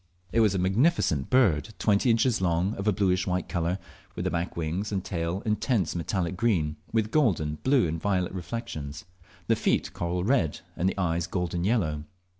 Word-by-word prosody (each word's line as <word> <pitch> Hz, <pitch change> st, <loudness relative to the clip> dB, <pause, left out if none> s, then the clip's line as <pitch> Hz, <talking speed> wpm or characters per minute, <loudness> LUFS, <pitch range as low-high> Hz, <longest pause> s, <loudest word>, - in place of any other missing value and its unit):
It -, -, +2 dB
was 105 Hz, -3 st, +4 dB
a -, -, +1 dB
magnificent 95 Hz, -, +2 dB
bird 110 Hz, -, +3 dB
twenty 105 Hz, +3 st, +2 dB
inches 115 Hz, -1 st, +3 dB
long, 90 Hz, +3 st, +1 dB
of 100 Hz, -1 st, -4 dB
a -, -, +5 dB
bluish 95 Hz, -2 st, +1 dB
white 90 Hz, -1 st, -1 dB
colour, 85 Hz, 0 st, -1 dB, 0.4 s
with -, -, -3 dB
the -, -, 0 dB
back 85 Hz, 0 st, -2 dB
wings 85 Hz, +6 st, -2 dB
and 95 Hz, -3 st, -1 dB
tail 85 Hz, +2 st, -2 dB
intense 105 Hz, -, 0 dB
metallic 85 Hz, +1 st, -1 dB
green, 85 Hz, -9 st, +1 dB
with 110 Hz, -1 st, 0 dB
golden, 80 Hz, -, +1 dB
blue, 130 Hz, -7 st, +3 dB
and 80 Hz, +1 st, -3 dB
violet 90 Hz, -2 st, 0 dB
reflexions, 90 Hz, -7 st, -5 dB, 0.4 s
the -, -, +3 dB
feet -, -, 0 dB
coral 90 Hz, +1 st, -2 dB
red, 100 Hz, -, +1 dB
and 90 Hz, +3 st, +1 dB
the -, -, -5 dB
eyes 85 Hz, -2 st, 0 dB
golden 90 Hz, -2 st, -2 dB
yellow. 85 Hz, -9 st, 0 dB
90 Hz, 180 wpm, -27 LUFS, 85-110 Hz, 0.4 s, a